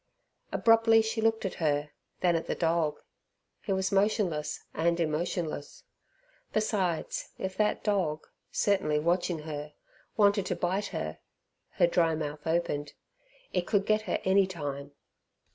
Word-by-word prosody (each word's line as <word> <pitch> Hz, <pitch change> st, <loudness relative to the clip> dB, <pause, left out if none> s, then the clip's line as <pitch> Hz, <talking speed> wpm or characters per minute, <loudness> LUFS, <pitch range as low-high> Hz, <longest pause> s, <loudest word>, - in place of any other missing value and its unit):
Abruptly 225 Hz, -1 st, +5 dB
she 220 Hz, +1 st, -2 dB
looked 225 Hz, -1 st, +1 dB
at 190 Hz, -, -2 dB
her, 145 Hz, -1 st, +1 dB, 0.3 s
then 175 Hz, -2 st, +3 dB
at 165 Hz, -, -2 dB
the -, -, -1 dB
dog. 165 Hz, -2 st, 0 dB, 0.6 s
He 205 Hz, -, -4 dB
was 190 Hz, 0 st, 0 dB
motionless 195 Hz, -6 st, +1 dB
and 170 Hz, +1 st, +1 dB
emotionless. 160 Hz, -1 st, -2 dB, 0.7 s
Besides 195 Hz, -6 st, -1 dB
if 190 Hz, 0 st, -4 dB
that 210 Hz, 0 st, +1 dB
dog 180 Hz, -8 st, 0 dB, 0.3 s
certainly 190 Hz, -7 st, +2 dB
watching 170 Hz, 0 st, 0 dB
her 150 Hz, -1 st, -6 dB, 0.4 s
wanted 200 Hz, -2 st, +4 dB
to -, -, -1 dB
bite 190 Hz, +3 st, -1 dB
her 75 Hz, -, -4 dB, 0.5 s
(her -, -, +4 dB
dry 170 Hz, -2 st, +2 dB
mouth 150 Hz, -1 st, -5 dB
opened) 155 Hz, -3 st, -1 dB, 0.6 s
it 180 Hz, -1 st, 0 dB
could 200 Hz, -2 st, +2 dB
get 215 Hz, 0 st, +3 dB
her -, -, +1 dB
any 190 Hz, 0 st, +4 dB
time. 145 Hz, -5 st, -5 dB
175 Hz, 135 wpm, -29 LUFS, 155-200 Hz, 0.7 s, Abruptly